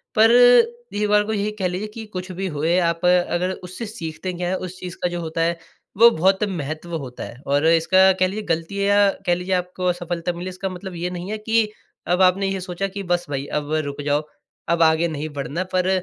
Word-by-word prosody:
पर 225 +1 +6
एक 245 - +4
बार 210 0 +4
को 220 +1 -3
यही 205 0 -1
कह 185 - +1
लीजिए 185 +4 -3
कि 225 0 -7
कुछ 185 0 -5
भी 190 +1 -3
होए, 165 +4 +2
आप 170 0 0
अगर 180 0 +2
उससे 185 +6 -6
सीखते 180 -2 -6
क्या 175 0 -3
हैं, 190 - 0
उस 185 0 -6
चीज़ 180 -1 -7
का 180 - +2
जो 175 - -4
होता 160 0 -3
है, 170 +1 +1 0.4
वो 235 +1 +9
बहुत 190 +4 +2
महत्व 165 -3 -4
होता 130 -4 -7
है - - -9
और 145 +2 +2
इसका 185 +4 +5
कह 185 - +4
लीजिए, 210 +3 -5
गलती 165 +4 -2
है 200 - +1
या 200 0 +5 0.2
कह 175 - +3
लीजिए 180 +2 -3
आपको 180 0 -3
असफलता 175 -1 -2
मिले, 175 +2 -5
इसका 185 +1 -4
मतलब 185 0 -8
ये 175 +1 -3
नहीं 180 +2 -6
है 215 - -2
कि 225 0 +1 0.4
अब 180 +2 +2
आपने 190 +2 +4
ये 195 0 -2
सोचा 185 +2 -3
कि, 195 +1 -6
"बस 175 -1 0
भाई, 140 -1 -3
अब 150 +1 -3
रुक 140 0 -5
जाओ, 145 +1 0 0.4
अब 170 0 +1
आगे 160 +1 +3
नहीं 155 -1 -4
बढ़ना।" 155 +6 -2
पर 185 0 +2
180 Hz, 230 wpm, -22 LUFS, 170-195 Hz, 0.4 s, वो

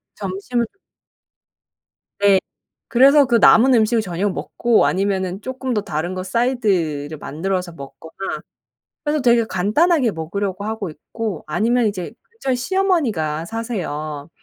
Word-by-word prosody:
점심을 205 +5 -2 1.6
네. 200 -1 +5 0.5
그래서 275 +4 +6
그 240 -2 +1
남은 245 +3 +6
음식을 225 0 +3
저녁에 190 0 -2
먹고 235 +4 +1
아니면은 190 0 -1
쪼끔 260 0 -4
더 210 - 0
다른 160 0 -3
거 185 0 -4
사이드를 185 - 0
만들어서 180 +4 -3
먹거나 160 +5 -8 0.7
그래서 295 -1 0
되게 235 -2 +4
간단하게 240 - +2
먹으려고 190 +4 -4
하고 220 -3 -3
있고 190 +5 -6
아니면 225 +9 +1
이제 190 -2 -4 0.2
근처에 275 - -2
시어머니가 245 - 0
사세요. 155 -10 -4
205 Hz, 300 characters per minute, -20 LUFS, 175-240 Hz, 1.6 s, 그래서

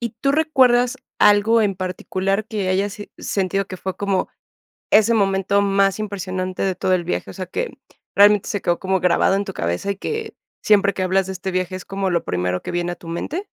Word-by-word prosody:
¿Y 235 -1 -2
tú 275 - +2
recuerdas 255 -6 +3 0.2
algo 210 +2 +5
en 200 -2 +1
particular 190 +2 -2
que 210 -4 -3
hayas 195 +2 0
si 205 - -10
sentido 195 0 -1
que 185 - -7
fue 190 0 -5
como 200 -2 -1 0.6
ese 220 +2 +5
momento 195 -1 +2
más 195 0 +2
impresionante 185 -3 -3
de 190 -1 0
todo 185 - 0
el 180 - +1
viaje, 170 - -3
o - - -8
sea, 185 - -5
que 480 - -4 0.4
realmente 205 0 +5
se 205 - -2
quedó 175 0 0
como 190 0 0
grabado 180 +1 +3
en 200 +1 -1
tu - - -6
cabeza, 85 - -2
y 200 - -5
que 445 - -4 0.3
siempre 200 -1 +4
que 190 - -2
hablas 190 0 +1
de 190 - -4
este 190 +1 -4
viaje 185 0 -2
es 185 - -8
como 195 -1 -2
lo 170 -2 0
primero 90 0 -2
que - - -6
viene 175 0 -1
a - - -9
tu 170 - -14
mente? 295 - -4
195 Hz, 215 wpm, -21 LUFS, 185-210 Hz, 0.6 s, algo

